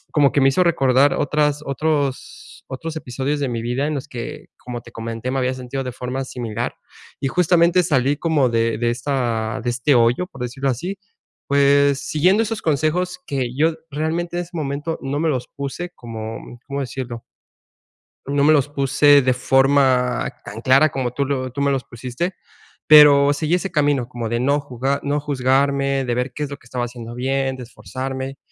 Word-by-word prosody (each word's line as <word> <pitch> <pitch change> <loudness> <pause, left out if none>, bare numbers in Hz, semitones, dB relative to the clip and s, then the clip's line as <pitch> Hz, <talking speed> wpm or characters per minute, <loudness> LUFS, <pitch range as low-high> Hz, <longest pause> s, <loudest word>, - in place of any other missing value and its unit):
como 145 -3 +5
que 140 - +2
me 135 - +5
hizo 180 +7 +3
recordar 135 -4 +3
otras 150 0 +1
otros 140 -1 -3
otros 160 +5 -6
episodios 140 +1 -3
de 135 - 0
mi 115 -1 -3
vida 125 +5 -1
en 155 - -2
los 140 +2 -5
que, 120 -3 -7 0.2
como 120 -1 -6
te - - -15
comenté, 115 +2 -5
me 135 - 0
había 130 0 0
sentido 130 +1 -5
de 125 - -4
forma 125 +2 -4
similar 120 -2 -4 0.4
y 135 - -1
justamente 175 +1 +3
salí 140 -2 +1
como 150 -5 +2
de 115 -1 +1
de 120 +1 +1
esta 120 -4 -2
de 120 - 0
este 125 +3 +2
hoyo, 120 +9 +3
por 135 -8 -12
decirlo 135 +3 -2
así, 175 +11 -3 0.5
pues, 140 0 +4
siguiendo 185 +8 +3
esos 220 0 -4
consejos 170 +4 0
que 135 -3 -1
yo 160 +3 +2 0.2
realmente 165 +4 -2
en - - 0
ese 170 - -16
momento 145 +1 -3
no 140 +2 -2
me 165 0 +1
los 125 -3 -2
puse 140 +5 -5
como, 110 -2 -7 0.3
¿cómo 140 0 -3
decirlo? 120 -2 -5 1.0
No 140 +1 +1
me 155 - +6
los 145 -1 +2
puse 145 +1 +4
de 130 0 +2
forma 130 -1 +2 0.2
tan 115 - -7
clara 135 +5 +5
como 130 -3 -2
tú 140 +2 -1
lo 130 -2 -2
tú 140 +3 -4
me 140 0 +2
los 135 -2 -1
pusiste. 125 +10 -5 0.5
Pero 145 -2 +8
seguí 155 +4 0
ese 185 +1 -3
camino 145 -6 +1
como 120 -2 -5
de 120 - -1
no 140 +4 +2
juga 135 +1 -2
no 145 +1 0
juzgarme 140 0 +1
de 120 - -1
ver 125 +1 -2
qué 150 - -4
es 140 - -4
lo 140 - -7
que - - -24
estaba 120 +1 -3
haciendo 120 -1 -8
bien, 135 +1 -1
de 125 - -7
esforzarme. 130 +5 -6
135 Hz, 190 wpm, -21 LUFS, 125-145 Hz, 1.0 s, Pero